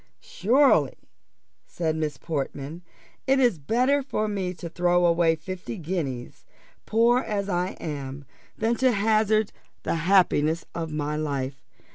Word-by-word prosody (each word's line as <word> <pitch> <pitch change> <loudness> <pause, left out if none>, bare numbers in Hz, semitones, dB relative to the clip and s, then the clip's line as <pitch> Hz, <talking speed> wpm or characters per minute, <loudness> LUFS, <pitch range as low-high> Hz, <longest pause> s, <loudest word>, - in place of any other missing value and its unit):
"Surely," 260 +8 +3 0.7
said 160 -2 -2
Miss 155 -3 -2
Portman, 145 +1 -4 0.5
"it 270 0 +4
is 240 -10 +3
better 250 - +2
for 215 -5 -2
me 195 -3 -2
to 175 -1 -7
throw 175 +1 +2
away 170 -1 +3
fifty 185 +6 -7
guineas, 150 -8 -4 0.4
poor 235 +3 +4
as 205 -5 -2
I 180 0 -1
am, 140 -2 -6 0.3
than 225 +2 +1
to 260 0 +3
hazard 215 0 +2 0.3
the - - -1
happiness 165 -3 +3
of 165 -2 -4
my 150 0 -2
life. 140 -3 -3
175 Hz, 130 wpm, -25 LUFS, 155-215 Hz, 0.7 s, it